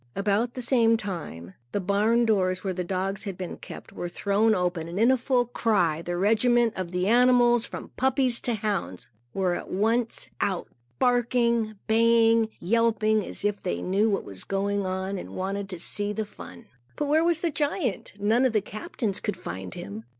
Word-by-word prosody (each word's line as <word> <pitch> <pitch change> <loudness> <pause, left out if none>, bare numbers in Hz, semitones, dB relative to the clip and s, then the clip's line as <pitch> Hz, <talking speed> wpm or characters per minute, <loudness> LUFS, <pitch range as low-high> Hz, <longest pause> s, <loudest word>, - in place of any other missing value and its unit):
About 210 +4 0
the 255 - -4
same 230 -2 +4
time, 155 - -6 0.2
the - - +1
barn 210 +5 +2
doors 185 -4 +1
where 190 -2 -1
the 180 0 -3
dogs 190 +3 -2
had 195 -3 -5
been 180 -2 -6
kept, - - -11
were 175 - -4
thrown 210 +4 +2
open. 175 -3 -1
In 235 +5 +5
full 250 -1 +1
cry, 200 -9 +1
a 175 0 -1
regiment 225 +4 +3
of 185 -2 -4
the 180 +1 -1
animals, 240 0 +4
from - - -8
puppies 260 -2 +2
to 240 - -1
hounds, 200 - -3 0.3
were 185 -2 0
at - - -5
once 225 +4 0
out, 190 -3 -1 0.3
barking, 235 - +2
baying, 230 0 +4
and - - -12 0.2
yelping, 220 -1 +2
as 200 - -6
if 205 -1 0
they 85 0 -3
knew 200 +4 +2
what 200 - 0
was 95 -2 -7
going 200 0 -1
on 190 +1 -3
and - - -9
wanted 195 +1 -3
to 180 -3 -6
see 205 +4 -2
the 220 +1 -2
fun. 90 - -12 0.3
But 295 - -1
where 310 +3 +3
was 335 -1 +1
the 340 - 0
giant? 290 - -2
None 220 +5 +3
of 255 - +2
the 215 - +2
captains 210 0 -4
could 210 - -3
find 90 +1 -7
him. 105 +3 -7
210 Hz, 185 wpm, -26 LUFS, 185-235 Hz, 0.3 s, In